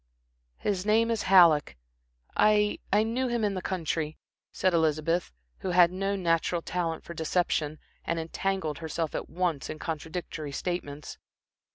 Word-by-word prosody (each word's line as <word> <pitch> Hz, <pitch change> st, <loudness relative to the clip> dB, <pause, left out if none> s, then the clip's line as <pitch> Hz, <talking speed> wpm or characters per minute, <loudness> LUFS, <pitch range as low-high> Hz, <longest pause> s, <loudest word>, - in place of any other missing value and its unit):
"His 195 Hz, -3 st, -1 dB
name 225 Hz, +2 st, +3 dB
is 225 Hz, -, 0 dB
Halleck. 160 Hz, -, +6 dB, 0.6 s
I 210 Hz, -1 st, +3 dB
I 210 Hz, +2 st, +4 dB
knew 245 Hz, +4 st, -1 dB
him 240 Hz, -2 st, -1 dB
in 205 Hz, -1 st, +1 dB
the 185 Hz, -, -3 dB
country," 165 Hz, -4 st, -2 dB, 0.3 s
said 185 Hz, -1 st, +1 dB
Elizabeth, 160 Hz, +1 st, +1 dB, 0.3 s
who 190 Hz, -, -3 dB
had 175 Hz, -1 st, +5 dB
no 195 Hz, +2 st, -1 dB
natural 170 Hz, -2 st, 0 dB
talent 165 Hz, -3 st, -2 dB
for 170 Hz, -, -8 dB
deception 160 Hz, -2 st, 0 dB, 0.3 s
and 170 Hz, -, -2 dB
entangled 165 Hz, -1 st, -2 dB
herself 160 Hz, -1 st, -3 dB
at -, -, -4 dB
once 170 Hz, -4 st, -1 dB
in 155 Hz, -, -5 dB
contradictory 155 Hz, -2 st, -5 dB
statements. 150 Hz, -4 st, -4 dB
175 Hz, 145 wpm, -28 LUFS, 160-195 Hz, 0.6 s, Halleck